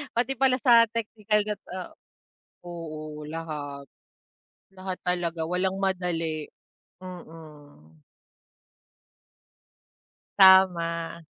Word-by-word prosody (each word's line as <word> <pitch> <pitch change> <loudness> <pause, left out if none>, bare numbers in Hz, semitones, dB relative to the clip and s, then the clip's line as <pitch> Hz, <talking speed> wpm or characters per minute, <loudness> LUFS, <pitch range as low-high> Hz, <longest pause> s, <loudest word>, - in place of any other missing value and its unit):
pati 245 +3 +1
pala 265 -1 +4
sa 235 -3 +6
teknikal 215 -2 -1
gat 210 -1 -4
oh 185 0 -7 0.7
oo, 155 -3 -7
lahat. 150 -3 -6 0.8
Lahat 185 -1 -7
talaga 175 -2 -2
walang 185 +1 -1
madali 165 -5 -2 0.6
mm. 150 - -13 2.4
Tama. 170 -3 +5
175 Hz, 75 wpm, -26 LUFS, 160-190 Hz, 2.4 s, sa